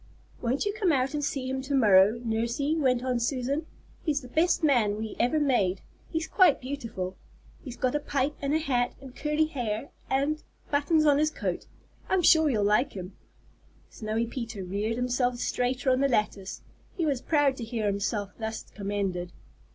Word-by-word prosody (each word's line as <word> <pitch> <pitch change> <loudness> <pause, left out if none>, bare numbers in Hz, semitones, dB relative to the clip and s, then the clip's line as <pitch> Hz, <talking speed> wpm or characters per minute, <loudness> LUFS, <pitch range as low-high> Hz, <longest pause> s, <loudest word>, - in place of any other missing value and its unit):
"Won't 250 - 0
you 410 - 0
come 405 -5 +1
out 270 -1 +1
and 295 -1 -2
see 275 -2 -2
him 265 0 -2
to 275 +1 -2
morrow, 210 -2 +5
Nursey?" 235 +7 0
went 255 -5 +2
on 250 -2 0
Susan. 270 +5 -1 0.4
"He's 295 -3 0
the 250 - -10
best 330 +5 +2
man 235 -9 +3
we 220 0 -5
ever 250 +6 +2
made. 205 -10 +1 0.3
He's 320 -1 -2
quite 365 -7 +4
beautiful. 230 -9 -5 0.5
He's 250 -4 -8
got 255 -1 0
a 295 - +1
pipe 285 0 -1
and 280 +1 0
a - - +5
hat 250 -6 0
and 265 -1 -12
curly 300 +1 +1
hair 245 -4 -3 0.2
and 280 +3 +1 0.3
buttons 295 +2 +3
on 290 -1 +5
his 305 0 +3
coat - - -4 0.4
I'm 380 -2 +2
sure 320 -1 +6
you'll 215 -6 +1
like 210 +6 +2
him." 185 0 -7 0.8
Snowy 220 +1 -2
Peter 230 -4 -5
reared 205 +5 -2
himself 245 0 0
straighter 250 +2 0
on 255 - +2
the 275 - +3
lattice. 210 -5 -1 0.3
He 335 - +1
was 275 -5 0
proud 290 -4 +2
to 240 - -5
hear 225 -1 -3
himself 200 0 -1
thus 220 0 -4
commended. 195 -3 -3
255 Hz, 180 wpm, -28 LUFS, 220-290 Hz, 0.8 s, sure